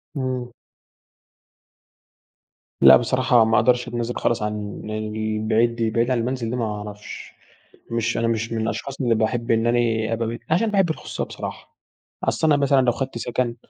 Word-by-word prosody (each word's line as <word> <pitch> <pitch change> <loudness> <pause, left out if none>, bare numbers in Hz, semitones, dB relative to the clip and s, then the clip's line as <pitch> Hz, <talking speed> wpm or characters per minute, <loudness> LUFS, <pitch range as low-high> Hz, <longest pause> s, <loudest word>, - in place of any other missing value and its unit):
امم. 130 -3 -3 2.3
لأ 65 -1 +9
بصراحة 125 - +3
ما 110 0 +2
اقدرش 125 0 +3
اتنازل 120 0 -3
خالص 120 - 0
عن 105 -1 -4
البعيد 110 +2 0
دي، 115 -1 0
البعيد 115 +3 +1
عن 125 - +2
المنزل 120 -1 -2
دي 125 - -2
ما 120 -2 -1
اعرفش. 105 -1 -7 0.6
مش 115 0 0
أنا 115 - +1
مش 115 0 -1
من 115 -1 -1
الأشخاص 135 +5 -4
اللي 120 -3 +2
باحب 115 +2 0
إن 115 0 +2
أنا 115 -2 +1
أبقى 115 0 -1
بت 115 +1 -4
عشان 205 +7 +2
باحب 195 -4 +2
الخصوصية 160 - -4
بصراحة. - - -8 0.5
أصل 160 - +1
أنا 150 -2 +5
مثلًا 140 -1 +4
لو 125 -1 +3
خدت 130 0 -4
سكن 120 0 -2
115 Hz, 160 wpm, -22 LUFS, 110-125 Hz, 2.3 s, لأ